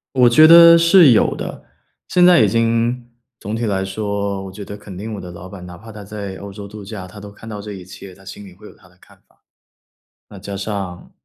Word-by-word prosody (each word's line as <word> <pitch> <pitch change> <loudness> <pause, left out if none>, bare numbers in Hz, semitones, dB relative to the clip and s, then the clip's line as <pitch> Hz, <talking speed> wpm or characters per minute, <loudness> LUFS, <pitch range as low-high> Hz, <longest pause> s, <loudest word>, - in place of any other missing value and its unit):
我 125 -2 +5
觉 155 +7 +6
得 170 0 +9
是 170 -4 +6
有 110 - +2
的。 - - -8 0.4
现 180 -1 +3
在 180 -6 +6
已 110 - +4
经 115 +2 -1 0.3
总 105 +2 -6
体 115 +1 -3
来 95 -2 -2
说， 100 0 -4
我 95 - -9
觉 100 +2 -10
得 100 - -9
肯 100 -3 -12
定 110 +2 -6
我 100 - -7
的 90 - -9
老 85 +1 -11
板， 95 -2 -11
哪 90 -1 -11
怕 110 +3 -13
他 105 -1 -11
在 100 -2 -8
欧 100 0 -10
洲 100 0 -10
度 105 0 -11
假， 95 -2 -8
他 105 +2 -13
都 105 - -11
看 115 +2 -14
到 105 -2 -7
这 105 0 -8
一 90 -2 -10
切， 95 +1 -12
他 95 +1 -19
心 100 +2 -11
里 95 - -14
会 95 +4 -17
有 - - -14
他 90 - -23
的 90 - -27
看 - - -21
法。 - - -35 0.9
那 100 - -12
加 100 +1 -8
上， 95 -3 -6
100 Hz, 265 characters per minute, -18 LUFS, 95-115 Hz, 0.9 s, 得